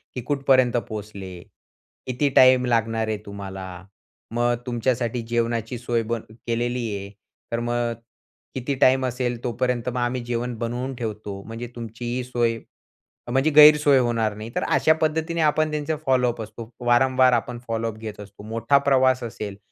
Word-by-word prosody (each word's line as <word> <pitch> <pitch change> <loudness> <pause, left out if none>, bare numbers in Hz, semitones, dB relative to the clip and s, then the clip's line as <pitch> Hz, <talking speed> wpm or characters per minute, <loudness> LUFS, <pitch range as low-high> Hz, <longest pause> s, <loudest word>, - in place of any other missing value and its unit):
की 125 - -3
"कुठपर्यंत 130 -2 +2
पोहोचले? 100 -4 -7 0.7
किती 130 +3 +1
टाईम 130 -1 +7
लागणार 115 -2 +1
आहे 110 - -1
तुम्हाला? 95 -2 -7 0.7
मग 120 +1 +1
तुमच्यासाठी 120 -1 -1
जेवणाची 115 0 -1
सोय 120 -1 -1
बन 115 0 -3 0.3
केलेली 120 +1 -1
आहे. 100 0 -6 0.4
तर 115 - 0
मग 120 0 -1 0.6
किती 130 +2 -2
टाईम 130 0 +5
असेल 125 -1 -2
तोपर्यंत 125 0 -1
मग 125 - -4
आम्ही 120 +1 -1
जेवण 120 0 -2
बनवून 125 +3 -3
ठेवतो, 105 -4 -5
म्हणजे 115 +3 -7
तुमची 120 +2 -4
सोय, 120 -2 0 0.7
म्हणजे 135 +5 +3
गैरसोय 150 -2 +7
होणार 115 -4 0
नाही." 110 +2 -7
तर - - 0
अशा 140 +3 +3
पद्धतीने 160 +2 0
आपण 155 0 +2
त्यांचे 150 +1 -2
फॉलोअप 125 -3 +2
असतो. 110 +1 -8
वारंवार 130 +1 +4
आपण 120 +1 -1
फॉलोअप 115 -1 -2
घेत 110 -2 -8
असतो. 100 0 -12
मोठा 115 +6 +2
प्रवास 130 -2 +3
असेल, 105 -4 -6
120 Hz, 145 wpm, -24 LUFS, 115-130 Hz, 0.7 s, टाईम